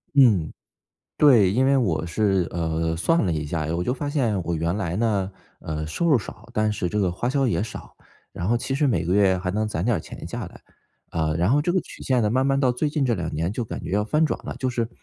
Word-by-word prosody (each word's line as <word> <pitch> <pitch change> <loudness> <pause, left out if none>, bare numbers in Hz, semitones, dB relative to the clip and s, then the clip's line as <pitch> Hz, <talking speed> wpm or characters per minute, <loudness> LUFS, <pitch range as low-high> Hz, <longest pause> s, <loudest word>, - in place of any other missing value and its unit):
嗯， 110 - +5 0.7
对， 120 -11 +6
因 130 +6 +2
为 135 +1 +4
我 85 -11 0
是 95 0 +1
呃， 80 -1 -1
算 165 - +2
了 90 - +1
一 75 -1 -2
下， 75 +1 -2
我 85 - -1
就 125 - 0
发 145 +2 -4
现 120 -10 0
我 85 +1 -2
原 85 +3 -1
来 90 -5 -2
呢， 100 -4 0 0.3
呃， 80 0 -4
收 170 - -1
入 145 -5 +5
少， 105 - -9
但 110 0 +1
是 90 -4 -2
这 105 - -1
个 95 -3 +1
花 120 +8 -2
销 135 0 +1
也 115 - 0
少， 110 - -9 0.4
然 90 - -4
后 120 +3 +3
其 135 +3 -3
实 145 0 +2
每 90 -8 +1
个 90 - +1
月 95 -2 +4
还 90 0 -3
能 110 +2 -1
攒 90 -4 -2
点 120 -1 +2
儿 - - -3
钱 - - -9
下 - - -5
来。 - - -15 0.5
呃， 80 -2 0
然 90 +5 +2
后 145 +2 +4
这 175 - 0
个 185 - +2
曲 - - -13
线 125 -3 +1
呢， 105 - +2
慢 130 +2 +2
慢 135 0 +2
到 130 -3 +3
最 145 +5 -1
近 145 -2 0
这 120 - +2
2 85 -5 -3
年 80 +4 -1
就 120 - -2
感 110 - -6
觉 - - -5
要 105 +2 +2
翻 150 +9 +2
转 - - -2
了， - - -6
就 130 - -1
是 120 -2 -1
105 Hz, 280 characters per minute, -24 LUFS, 85-130 Hz, 0.7 s, 对